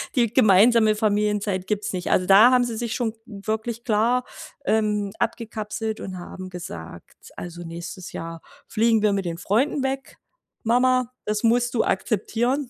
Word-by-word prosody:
Die 235 -4 +2
gemeinsame 220 0 +5
Familienzeit 210 -2 0
gibt's 210 -1 -2
nicht. 180 -1 -3
Also, 185 - +3
da 205 +6 +7
haben 250 -1 +4
sie 230 -2 -4
sich 235 0 -3
schon 230 -3 -1
wirklich 220 +2 -4
klar, 235 +3 +2 0.4
ähm, 210 -2 +1
abgekapselt 220 -1 -3
und 185 -1 -6
haben 185 +1 -8
gesagt: 85 - -10
„Also, 175 0 -7
nächstes 170 +2 -8
Jahr 165 0 -7 0.3
fliegen 225 0 +2
wir 210 -1 +3
mit 195 -1 -1
den 170 -1 -3
Freunden 250 - 0
weg. 270 0 -4 0.5
Mama, 255 +1 +2
das 210 +1 -1
musst 240 +1 +2
du 225 - +3
akzeptieren.“ 240 +7 -1
215 Hz, 150 wpm, -24 LUFS, 195-235 Hz, 0.5 s, da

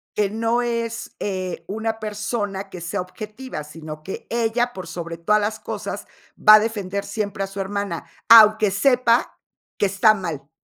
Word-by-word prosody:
Que 205 -2 +1
no 230 +3 0
es, 230 -1 -3
eh, 185 -3 -3
una 220 +2 -3
persona 205 -2 -3
que 180 -2 -9
sea 170 +2 -2
objetiva, 215 +3 -7
sino 155 0 -9
que 190 - -7
ella, 235 +1 0
por 185 -2 -8
sobre 170 0 -6
todas 210 +6 +2
las 215 +1 -2
cosas, - - -6 0.3
va 215 - +8
a - - +7
defender 200 -3 -3
siempre 200 -1 -3
a 195 - -3
su 195 +1 -8
hermana, 195 -2 -3 0.2
aunque 215 -2 +8
sepa 245 +2 +2 0.4
que 205 - +2
está 200 +3 +4
mal. 165 -8 -5
205 Hz, 165 wpm, -22 LUFS, 190-225 Hz, 0.4 s, va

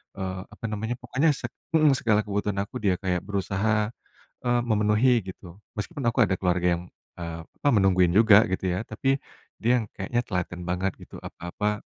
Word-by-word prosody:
eee, 95 -1 -4
apa - - -7
namanya, 110 +2 -2
pokoknya 130 +6 +1
seg - - -5 0.2
mhm, 155 -2 +5
segala 110 -3 +2
kebutuhan 105 -1 -2
aku 105 - -14
dia 100 -5 +2
kayak 90 -1 0
berusaha, 100 +2 0 0.5
eee, 120 -1 +2
memenuhi, 110 +2 +3
gitu. 90 -2 -9 0.2
Meskipun 140 +9 -4
aku 115 - -2
ada 95 - 0
keluarga 90 -1 +2
yang, 85 - -7 0.3
eee, 85 -1 -6
apa, 145 - -1
menungguin 95 -4 +4
juga, 105 +2 +7
gitu 95 - -2
ya, - - -1
tapi 135 +5 0 0.5
dia 120 +2 +4
yang 110 - -4
kayaknya 120 +5 -1
telaten 90 -2 -3
banget, 90 +2 0
gitu, - - -12
apa-apa 105 +4 -3
105 Hz, 170 wpm, -26 LUFS, 95-115 Hz, 0.5 s, juga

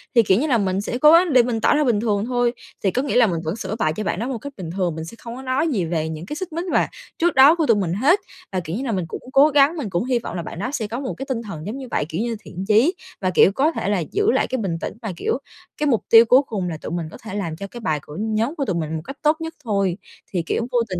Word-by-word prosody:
Thì, 235 - +7
kiểu 195 0 +3
như 300 - 0
là, 255 -5 +3
mình 195 -2 0
sẽ 240 - -3
cố 300 +4 +7
gắng 340 -2 +5
để 250 -2 +7
mình 230 -2 -2
tỏ - - +4
ra 300 - +3
bình 240 -7 +2
thường 210 -2 0
thôi, 245 -1 +1 0.3
thì 195 - +2
có 255 - 0
nghĩa 280 - -2
là 245 -2 +6
mình 170 -4 -1
vẫn 160 +4 -2
sửa 215 -2 -4
bài 155 -5 +1
cho 215 - -3
bạn 190 - -2
đó 235 - -2
một 260 -2 -3
cách 285 +5 -8
bình 180 -4 -6
thường, 180 -4 -1
mình 160 0 -5
sẽ 170 - -10
không 235 0 -8
có 260 - -8
nói 265 +4 0
gì 215 - 0
về 160 -1 -1
những 160 +1 -6
cái 295 - -5
xích 360 +1 -6
mích 340 +3 -3
và - - +3 0.3
trước 345 +1 +1
đó 275 +4 +8
của 330 -3 +1
tụi 230 -6 +4
mình 180 -4 -1
hết. 280 - +3 0.3
Và, 190 - -1
kiểu 170 -1 -5
như 250 - -3
là, 240 - -1
mình 185 -5 -1
cũng - - -7
cố 275 +2 +7
gắng, 290 +2 +4
mình 265 -9 -3
cũng 175 -1 -1
hy 255 -2 +1
vọng - - -7
là 175 - -2
bạn 170 - -7
đó 245 - -2
sẽ 220 -7 -2
có 230 +4 -4
một 270 -2 -4
cái 270 - -5
tinh 245 -3 -1
thần 165 -8 -7
giống 215 +6 -4
như 265 -2 -7
vậy, - - 0
kiểu 165 +5 -2
như 235 0 -1
thiện 185 -2 -7
chí 225 - +4 0.3
và, 185 - +1
kiểu, 185 +1 +5
có 280 +10 +2
thể 200 - -3
là 205 -2 +1
giữ 415 +2 +2
lại - - +1
cái 260 - -2
bình 190 -8 -2
tĩnh - - -4
và, 220 -4 -4
kiểu, - - 0 0.4
cái 300 - 0
mục 240 -6 +2
tiêu 225 0 +8
cuối 250 +4 +6
cùng 195 -5 -3
là 160 - -4
tụi 155 - -7
mình 170 -1 -2
có - - -10
thể 225 - -7
làm 175 -6 -3
cho 195 +5 -7
cái 240 - -10
bài 155 -7 0
của 150 - -10
nhóm 220 +6 -1
của 280 - -2
tụi 190 - -1
mình 160 -1 -2
một 160 - -3
cách 275 - -8
tốt 305 +1 +3
nhất 325 0 -4
thôi. 200 -6 0 0.4
Thì 175 -3 0
kiểu, 230 +7 -1
vô 245 - +3
tình 185 -2 -3
225 Hz, 330 wpm, -22 LUFS, 185-265 Hz, 0.4 s, đó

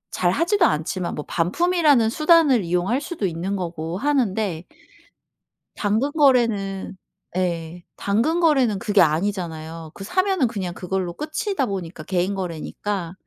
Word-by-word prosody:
잘 175 - +2
하지도 345 - +2
않지만 170 - -1
뭐 150 - -5
반품이라는 290 - +2
수단을 305 - +4
이용할 180 +9 0
수도 315 - -4
있는 180 +3 -2
거고 170 -2 -4
하는데 215 - 0 1.1
당근 220 +7 0
거래는 230 -10 +2 0.4
예. 175 -1 -2
당근 235 +13 +1
거래는 265 - +3
그게 205 -1 +3
아니잖아요. 165 -2 -1
그 195 - -9
사면은 370 - +1
그냥 190 -6 -4
그걸로 185 -1 -3
끝이다 310 - -2
보니까 180 -6 -5
개인 185 +3 0
거래니까. 180 +1 -4
195 Hz, 305 characters per minute, -22 LUFS, 175-275 Hz, 1.1 s, 수단을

